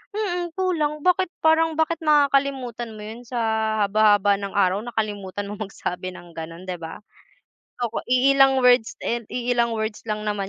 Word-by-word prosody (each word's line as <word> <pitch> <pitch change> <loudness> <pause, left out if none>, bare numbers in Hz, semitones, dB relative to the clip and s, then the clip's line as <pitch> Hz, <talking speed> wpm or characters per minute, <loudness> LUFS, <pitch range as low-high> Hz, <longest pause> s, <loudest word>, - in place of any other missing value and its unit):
Mm, 355 -5 -2
kulang, 310 -5 0
bakit 365 0 +3
parang, 320 0 +3
bakit 325 +1 0
nakakalimutan 275 -5 +1
mo - - -9
'yon 225 +3 -8
sa 245 0 -3 0.5
haba-haba 205 -1 +4
ng 200 -1 -4
araw, 195 -1 +2
nakalimutan 205 -4 -4
mong 210 -1 -6
magsabi 185 -1 -5
ng 175 -1 -13
gano'n, 165 +2 -8
diba? 175 -3 -6 0.8
Naku, 240 -2 -2
iilang 270 +1 +4
words 245 -3 +4
and 235 -2 -2
iilang 240 -1 0
words 220 0 -3
lang 215 0 -2
naman 205 -2 -2
235 Hz, 150 wpm, -23 LUFS, 205-280 Hz, 0.8 s, haba-haba